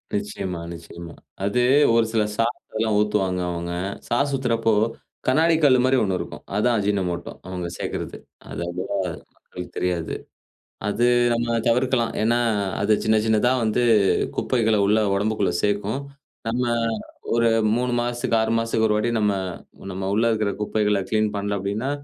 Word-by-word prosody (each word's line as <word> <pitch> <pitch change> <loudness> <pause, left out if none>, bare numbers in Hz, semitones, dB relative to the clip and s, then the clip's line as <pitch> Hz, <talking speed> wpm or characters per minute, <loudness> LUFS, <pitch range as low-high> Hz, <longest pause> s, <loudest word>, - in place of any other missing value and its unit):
நிச்சியமா, 100 -4 -3
நிச்சியமா. 85 0 -10 0.3
அது 125 +5 +1 0.3
ஒரு 115 -1 +4
சில 110 -2 +2
சாஸ்லாம் 115 -1 -1
ஊத்துவாங்க 95 -4 +1
அவுங்க. 85 0 -4 0.3
சாஸ் 140 +4 +1
ஊத்துறப்போ, 115 -4 +1 0.5
கண்ணாடி 160 +5 +4
கல்லு 130 -3 +6
மாரி 130 0 +3
ஒண்ணு 95 -2 0
இருக்கும். - - -7
அதான் 115 +3 +2
அஜினமோட்டோ 95 -4 -1 0.2
அவுங்க 90 -2 -4
சேக்கிறது. - - -4 0.3
அது - - -5
அவ்வளவா 90 +3 -3 0.4
மக்களுக்கு 90 -1 -10
தெரியாது. 90 -3 -1 0.7
அது 120 +4 +1 0.3
நம்ம 115 0 0
தவிர்க்கலாம். 125 0 +2
ஏன்னா, 120 +2 +2 0.4
அது 105 +1 +3
சின்ன 110 0 +4
சின்னதா 110 +3 +3
வந்து 110 +3 +1 0.6
குப்பைகள 110 -4 +2
உள்ள 105 +2 +3 0.2
உடம்புக்குள்ள 105 -2 0
சேர்க்கும். 105 +5 0 0.5
நம்ம 120 +2 0 0.7
ஒரு 115 0 +4 0.3
3 125 0 0
மாசத்துக்கு, 120 -1 0
6 110 0 0
மாசத்துக்கு 115 -1 +1
1 105 - +2
வாட்டி 120 +2 0
நம்ம, 105 -1 +2 0.6
நம்ம 95 +1 -3
உள்ள 115 - +2
இருக்கிற 105 -2 0
குப்பைகள 105 -1 +1
கிளீன் 110 -1 +2
பண்ல 100 0 -1
அப்டின்னா, 100 +7 -2
110 Hz, 140 wpm, -23 LUFS, 100-120 Hz, 0.7 s, கல்லு